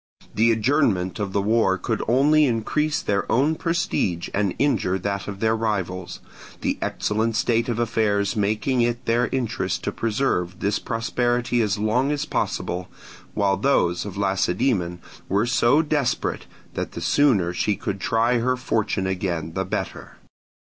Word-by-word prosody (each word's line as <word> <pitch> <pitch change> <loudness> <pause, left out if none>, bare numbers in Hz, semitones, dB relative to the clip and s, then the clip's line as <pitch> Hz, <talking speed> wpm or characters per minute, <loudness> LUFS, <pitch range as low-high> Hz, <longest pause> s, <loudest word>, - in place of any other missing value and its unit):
The 115 +3 +4
adjournment 110 -6 +1
of 100 -2 -2
the 100 0 0
war 105 -3 +2
could 110 +2 -2
only 145 +6 +4
increase 145 +6 0
their 100 -1 -1
own 140 +6 +3
prestige 160 - -1
and 100 -2 0
injure 95 -10 +1
that 100 +1 -3
of 100 -1 -6
their 110 0 +2
rivals; 95 -5 -3 0.4
the - - -1
excellent 110 +2 -1
state 115 +1 +1
of 115 - -1
their 120 - +2
affairs 105 -2 0
making 110 +5 +1
it 120 +1 -1
their 120 +2 +2
interest 130 -4 -2
to - - -1
preserve 105 -6 -1
this 100 +1 0
prosperity 120 +1 0
as 105 -2 0
long 115 +7 +1
as 145 -1 -1
possible, 90 +1 -2 0.5
while 100 -2 +2
those 90 -7 +2
of 105 -2 -7
Lacedaemon 95 -1 0 0.3
were 100 +3 +2
so 120 +5 +3
desperate 145 -4 -1 0.3
that - - -4
the - - -6
sooner 105 -12 +3
she 100 +3 0
could 100 +1 -4
try 115 +3 +2
her 130 +2 +1
fortune 110 -6 -1
again 90 -4 -2
the 95 +1 -2
better. 95 - -5
110 Hz, 155 wpm, -23 LUFS, 95-120 Hz, 0.5 s, The